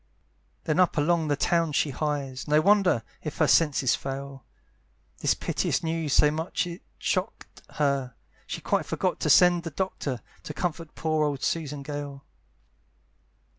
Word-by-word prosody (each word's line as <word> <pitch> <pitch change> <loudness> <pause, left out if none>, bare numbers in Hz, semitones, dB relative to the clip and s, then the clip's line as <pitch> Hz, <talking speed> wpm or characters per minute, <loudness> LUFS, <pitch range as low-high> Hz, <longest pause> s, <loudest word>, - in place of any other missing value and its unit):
Then 155 +2 0
up 180 -2 +3
along 160 +2 +2
the 145 - +2
town 165 +1 +1
she 145 0 +1
hies, 140 -2 -3
No 150 +1 +4
wonder 185 - +3 0.2
if 155 - -6
her 160 - +4
senses 145 -5 +3
fail, 135 0 -5 0.8
This - - +2
piteous - - -1
news 160 -2 -2
so 150 +2 +5
much 160 +4 -2
it 175 0 -7 0.2
shock'd - - -3
her, 140 -4 0 0.3
She - - -5
quite - - 0
forgot - - -1
to - - -1
send 175 -1 +6
the 165 - -5
Doctor, 145 - -3 0.2
To 150 - -8
comfort 165 0 -3
poor 155 -1 0
old 145 -3 -1
Susan 150 -4 -2
Gale. 145 -1 -6
150 Hz, 150 wpm, -27 LUFS, 140-165 Hz, 0.8 s, send